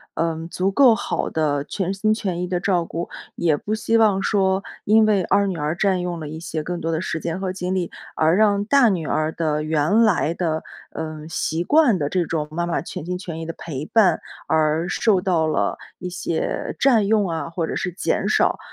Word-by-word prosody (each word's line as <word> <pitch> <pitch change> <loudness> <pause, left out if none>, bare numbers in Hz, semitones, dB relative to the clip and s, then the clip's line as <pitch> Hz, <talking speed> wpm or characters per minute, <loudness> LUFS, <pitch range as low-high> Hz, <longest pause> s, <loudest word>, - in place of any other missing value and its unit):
呃， 165 0 -2
足 185 +1 0
够 250 +3 +6
好 - - -2
的 145 -3 0
全 190 +4 -3
心 215 +2 +1
全 190 -5 -3
意 180 - -2
的 180 0 -1
照 180 -2 +1
顾， 170 +1 -5 0.3
也 165 -3 +2
不 210 - -4
希 225 +1 +1
望 210 -4 +3
说 190 -1 +1 0.2
因 220 +1 +5
为 205 -3 +2
2 200 +3 +2
女 185 -3 -3
儿 150 +1 -1
占 190 -1 +1
用 175 -1 -3
了 155 - -6
一 155 +2 -7
些 165 -2 -3
更 175 +2 -4
多 165 - -1
的 160 - 0
时 165 - -3
间 170 +2 -3
和 190 -1 -2
精 185 0 -3
力， 180 -2 -1 0.3
而 160 +2 +3
让 205 -1 +3
大 260 0 +5
女 175 -6 -1
儿 155 0 0
的 155 -2 -1
原 155 +7 +2
来 180 -7 +2
的， 160 -3 -2 0.3
呃， 155 -1 -6
习 165 0 -1
惯 290 - +4
的 145 -4 -1
这 180 0 0
种 155 -2 -2
妈 170 +2 -2
妈 170 - -1
全 - - -7
心 180 +1 -3
全 170 -3 -6
意 165 - -5
的 165 - -5
陪 150 -3 -5
伴 185 -4 +3 0.3
而 160 +2 +1
受 200 -3 +2
到 170 -4 +1
了 155 - 0 0.2
一 180 - -5
些 170 -2 -3
占 230 -7 +4
用 210 -3 +2
啊， 165 -2 -3
或 165 0 -2
者 - - -4
是 180 - -2
减 185 - -1
少。 - - +2
175 Hz, 230 characters per minute, -22 LUFS, 160-195 Hz, 0.3 s, 够